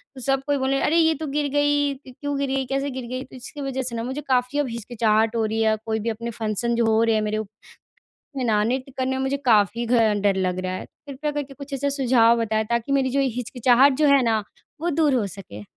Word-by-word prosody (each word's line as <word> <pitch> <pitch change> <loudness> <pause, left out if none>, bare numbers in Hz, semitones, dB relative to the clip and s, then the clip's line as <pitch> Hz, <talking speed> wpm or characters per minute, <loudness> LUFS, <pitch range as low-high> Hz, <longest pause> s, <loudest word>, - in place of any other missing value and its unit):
तो 260 - -9
सब 270 +1 +1
कोई 285 -1 +2
बोले, 270 0 0
"अरे, 325 - +2
ये 320 -1 +4
तो 310 +2 -5
गिर 290 +1 -1
गई, 290 0 +2
क 260 -1 -15
क्यों 285 -1 -2
गिरी, 270 -1 -1
कैसे 275 +2 -2
गिर 260 -1 -6
गई?" 255 +2 -4
तो - - -15
इसकी 260 +4 -9
वजह 270 -1 -2
से 245 -2 -4
ना 230 - -3
मुझे 265 +4 -4
काफ़ी 255 +2 +1
अब 285 - +1
हिचकिचाहट 225 -1 0
हो 225 -1 +1
रही 220 +1 -2
है - - +3
या 220 0 +3
कोई 220 -1 -1
भी 230 +2 -2
अपने 230 +1 -4
फ़ंक्शन 225 +2 -2
जो 235 0 +2
हो 225 0 +3
रहे 225 -1 +2
हैं 215 - +1
मेरे 215 0 -1 1.0
में 260 - -1
ना 215 -3 +2
नृत्य 260 +3 -2
करने 260 0 0
में 265 - -2
मुझे 265 +1 0
काफ़ी 220 +1 +3
घ 235 - -2 0.3
डर 200 -1 +2
लग 185 -1 -1
रहा 185 - -2
है। - - -5 0.2
कृपया 285 +2 -3
करके 285 -2 -5
कुछ 280 +1 -11
ऐसे 280 +1 -1
सुझाव 245 -4 +3
बताएँ 220 -1 0
ताकि 235 +3 0
मेरी 270 -2 +2
जो 275 +2 +1 0.2
हिचकिचाहट 250 +2 +3
जो 300 - +5
है 270 - +3
ना, 220 -2 +1 0.4
वो 345 +2 0
दूर 300 -2 +2
हो 230 -5 +1
सके। 175 - -10
255 Hz, 250 wpm, -23 LUFS, 225-275 Hz, 1.0 s, जो